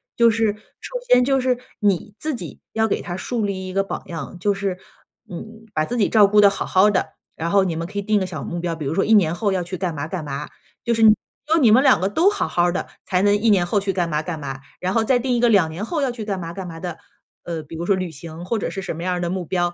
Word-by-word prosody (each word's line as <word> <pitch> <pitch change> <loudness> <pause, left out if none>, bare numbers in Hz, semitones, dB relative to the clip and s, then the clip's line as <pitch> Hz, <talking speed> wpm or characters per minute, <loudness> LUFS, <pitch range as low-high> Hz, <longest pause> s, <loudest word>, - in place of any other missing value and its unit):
就 235 -1 +5
是， 225 -1 +1 0.3
首 - - -5
先 250 0 +6
就 270 +1 +2
是 255 -1 +1 0.2
你 205 0 0
自 310 -3 -1
己 - - -8
要 220 0 +1
给 - - 0
他 175 - -5
树 220 +3 -2
立 190 -2 -3
一 185 - -5
个 195 +1 +1
榜 - - -5
样， 165 0 -6
就 205 +3 +1
是， 195 -2 -2 0.5
嗯， 220 +5 -9
把 155 0 +1
自 245 - -4
己 205 - +2
照 210 -3 +6
顾 210 +1 +5
得 200 - +8
好 - - -3
好 195 +3 +4
的。 160 -5 -1 0.2
然 165 +1 -2
后 200 +1 +4
你 180 -3 -1
们 165 +1 -3
可 205 - -9
以 - - +1
定 210 0 +2
个 190 - -1
小 155 -6 -6
目 175 - -4
标， 170 -1 -2
比 155 -3 -6
如 140 - -1
说 195 - +1
1 220 - +3
年 170 -6 +5
后 200 +1 0
要 185 -2 0
去 180 +2 -6
干 175 -3 -2
嘛 145 +2 -4
干 175 -5 -4
嘛。 145 +1 -5 0.3
就 235 - +1
是 225 - +2
只 215 -1 +8 0.4
有 - - +4
你 225 -4 +6
们 250 +4 +7
两 200 - +5
个 190 - +1
都 335 - +4
好 410 - -2
好 175 - +2
儿 175 0 +2
的， 190 - -3 0.2
才 180 0 +1
能 205 0 +4
1 225 +2 +2
年 190 -4 +4
后 200 +4 +1
去 195 -1 -2
干 175 -2 0
嘛 150 -1 0
干 165 0 -4
嘛。 135 -2 -6 0.2
然 185 +1 -1
后 225 -1 +2
再 255 +2 +3
定 250 -1 0
一 - - 0
个 240 - +4
2 190 -8 +4
年 180 +7 -5
后 320 +2 -2
要 270 -3 +1
去 230 -3 -6
干 200 -2 -2
嘛 170 -2 -5
干 185 +1 -6
嘛 165 -1 -8
的， 175 -3 -5 0.5
呃， 165 -2 -4
比 150 +2 -10
如 170 - -3
说 195 - +3
旅 185 -3 -3
行， 160 +3 -9
或 215 +4 -1
者 - - -2
是 195 - -5
什 175 -4 -5
么 170 - -5
样 180 0 0
儿 180 - -2
的 175 - -1
目 180 -1 -3
标。 175 0 0
190 Hz, 320 characters per minute, -22 LUFS, 170-215 Hz, 0.5 s, 得